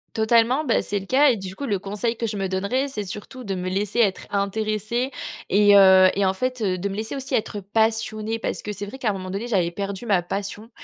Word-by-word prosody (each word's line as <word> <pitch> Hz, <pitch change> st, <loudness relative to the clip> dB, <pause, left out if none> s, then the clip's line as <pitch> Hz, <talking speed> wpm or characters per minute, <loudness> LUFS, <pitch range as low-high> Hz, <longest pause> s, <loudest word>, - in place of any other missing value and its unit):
Totalement. 230 Hz, +5 st, +3 dB
Bah 250 Hz, -6 st, +2 dB
c'est 205 Hz, 0 st, -2 dB
le 195 Hz, -, -9 dB
cas 280 Hz, +6 st, +5 dB
et 235 Hz, -, 0 dB
du 190 Hz, -2 st, -8 dB
coup, 285 Hz, -, -4 dB
le 205 Hz, -6 st, 0 dB
conseil 210 Hz, +5 st, -2 dB
que 230 Hz, -, -3 dB
je 210 Hz, -2 st, -3 dB
me 195 Hz, -1 st, -1 dB
donnerais, 200 Hz, +9 st, -1 dB
c'est 215 Hz, -6 st, -4 dB
surtout 210 Hz, +6 st, -8 dB
de 200 Hz, -4 st, -3 dB
me 185 Hz, -1 st, -4 dB
laisser 200 Hz, +4 st, -1 dB
être 200 Hz, -5 st, +2 dB
intéressée 215 Hz, +5 st, -1 dB, 0.4 s
et 205 Hz, +1 st, +5 dB
heu, 190 Hz, -1 st, +8 dB
et 200 Hz, -, +1 dB
en 190 Hz, -, +2 dB
fait, 255 Hz, +4 st, -3 dB
heu, 185 Hz, -3 st, 0 dB
de 195 Hz, +3 st, -2 dB
me 195 Hz, -, -5 dB
laisser 220 Hz, +6 st, -4 dB
aussi 270 Hz, -1 st, -3 dB
être 215 Hz, -1 st, -2 dB
passionnée 220 Hz, +2 st, 0 dB
parce -, -, -3 dB
que 210 Hz, -, -5 dB
c'est 205 Hz, 0 st, -5 dB
vrai 225 Hz, +6 st, -9 dB
qu'à 240 Hz, -5 st, -1 dB
un -, -, 0 dB
moment 185 Hz, -1 st, -6 dB
donné 200 Hz, +6 st, -4 dB
j'avais 180 Hz, -5 st, +1 dB
perdu 200 Hz, +4 st, -5 dB
ma 195 Hz, -6 st, +2 dB
passion, 200 Hz, +4 st, -5 dB
210 Hz, 250 wpm, -23 LUFS, 195-230 Hz, 0.4 s, heu